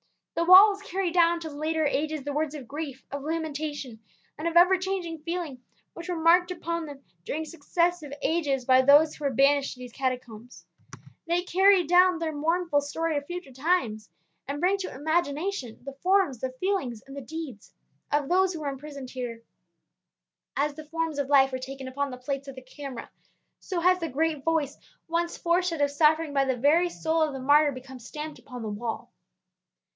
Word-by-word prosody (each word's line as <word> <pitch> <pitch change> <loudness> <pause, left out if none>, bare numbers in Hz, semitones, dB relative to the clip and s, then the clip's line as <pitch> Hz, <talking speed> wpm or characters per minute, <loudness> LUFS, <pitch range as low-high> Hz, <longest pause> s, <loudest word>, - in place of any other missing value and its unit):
The 335 - 0
walls 395 +3 +8
carry 380 -2 -2
down 340 0 +4
to 320 - -5
later 310 +2 -1
ages 300 +1 -1
the 285 +1 -4
words 305 0 -1
of 270 -5 -8
grief, 280 -2 -6
of 280 0 -4
lamentation, 295 -5 -4 0.4
and 310 - -4
of 335 0 +1
ever 360 +2 +7
changing 370 -3 -3
feeling 320 -5 -4 0.3
which 340 +2 -9
were 355 - -1
marked 340 +2 +4
upon 335 -2 -3
them 280 -2 -10 0.2
during 315 - -3
successive 335 0 -1
ages 285 -6 0
by 260 0 +6
those 290 +3 +6
who 295 - -7
were - - +3
banished 275 +2 +3
to - - -17
these 250 -1 -9
Catacombs. 250 -3 -5 0.6
They 345 +1 +1
carry 380 +1 +4
down 360 +2 +5
their 325 -1 -3
mournful 325 0 +1
story 325 +3 -2
to 290 - 0
future 350 -1 -7
times, 260 -7 -1 0.4
and 280 +1 -3
bring 370 +4 +2
to 385 - -5
imagination 310 - -2
the 275 +1 -7
forms, 360 - +1
the 260 - -2
feelings 265 - -2
and 275 0 -11
the 280 - -6
deeds 280 -5 -8 0.4
of 290 -1 +1
those 370 +1 +3
who 320 - -6
were 290 - -2
imprisoned 275 -1 -8
here. 240 -3 -6 1.1
As 290 +1 +1
the 310 +1 -10
forms 325 -1 -3
of 280 -1 -2
life 270 -2 +5
are 260 - -2
taken 265 0 -7
upon 280 +2 -2
the 250 - -7
plates 275 +2 -4
of 275 - -8
the 260 - -10
camera, 265 -1 -8 0.5
so 365 -3 -3
has 365 +1 +4
the 330 -2 -3
great 310 +1 -1
voice 320 -3 0 0.3
once 340 +1 -1
forced 355 +1 +1
out 330 - -3
by 285 - +4
suffering 300 +1 +2
from 275 -1 +2
the 260 -1 0
very 315 +8 +3
soul 325 -1 -1
of 310 -2 +1
the 270 - -5
martyr 290 +3 +4
become 260 0 -10
stamped 300 +6 -7
upon 250 -2 -9
the 215 - -3
wall. 225 +2 -5
300 Hz, 190 wpm, -27 LUFS, 270-335 Hz, 1.1 s, walls